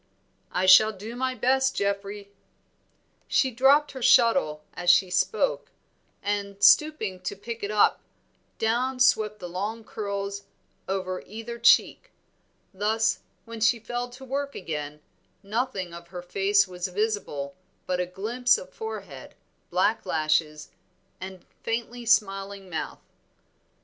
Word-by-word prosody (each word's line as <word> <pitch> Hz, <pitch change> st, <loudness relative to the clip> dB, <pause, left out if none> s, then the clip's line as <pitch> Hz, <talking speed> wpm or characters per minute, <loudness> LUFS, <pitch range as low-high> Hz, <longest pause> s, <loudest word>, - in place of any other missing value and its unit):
"I 180 Hz, -, 0 dB
shall 215 Hz, +4 st, +8 dB
do 215 Hz, +3 st, -8 dB
my 260 Hz, +1 st, -1 dB
best, 265 Hz, +3 st, +2 dB
Geoffrey." 200 Hz, 0 st, -3 dB, 1.0 s
She 260 Hz, -, +2 dB
dropped 275 Hz, +5 st, +4 dB
her 260 Hz, -, -8 dB
shuttle 230 Hz, -, +4 dB
as 175 Hz, 0 st, -1 dB
she 180 Hz, +1 st, +5 dB
spoke, -, -, 0 dB, 0.5 s
and 200 Hz, -1 st, -2 dB
stooping 295 Hz, -12 st, +4 dB
to 185 Hz, +2 st, -5 dB
pick 230 Hz, +4 st, -7 dB
it 200 Hz, -, -2 dB
up, 210 Hz, -1 st, +3 dB, 0.6 s
down 250 Hz, +4 st, 0 dB
swept 215 Hz, -4 st, +3 dB
the 180 Hz, -, -7 dB
long 205 Hz, +6 st, -4 dB
curls 200 Hz, -2 st, -5 dB, 0.4 s
over 185 Hz, -1 st, -3 dB
either 225 Hz, +3 st, -7 dB
cheek; 235 Hz, -, +4 dB, 0.6 s
thus, 215 Hz, +3 st, +1 dB, 0.3 s
when 230 Hz, -1 st, -9 dB
she 230 Hz, +2 st, +4 dB
fell 240 Hz, +2 st, -4 dB
to 255 Hz, +2 st, -12 dB
work 280 Hz, +2 st, -3 dB
again, 150 Hz, -3 st, -5 dB, 0.4 s
nothing 200 Hz, -4 st, -3 dB
of 170 Hz, 0 st, -10 dB
her 175 Hz, 0 st, -8 dB
face 195 Hz, +3 st, +2 dB
was 180 Hz, 0 st, -4 dB
visible 185 Hz, -8 st, -2 dB, 0.3 s
but 180 Hz, -1 st, -1 dB
a 180 Hz, -, -1 dB
glimpse 235 Hz, -, +1 dB
of -, -, -11 dB
forehead, 445 Hz, 0 st, -8 dB, 0.3 s
black 185 Hz, +5 st, +1 dB
lashes 155 Hz, -1 st, 0 dB, 0.5 s
and 185 Hz, 0 st, -9 dB, 0.2 s
faintly 235 Hz, +1 st, -4 dB
smiling 195 Hz, -3 st, +1 dB
mouth. 160 Hz, -, -5 dB
205 Hz, 130 wpm, -26 LUFS, 185-240 Hz, 1.0 s, shall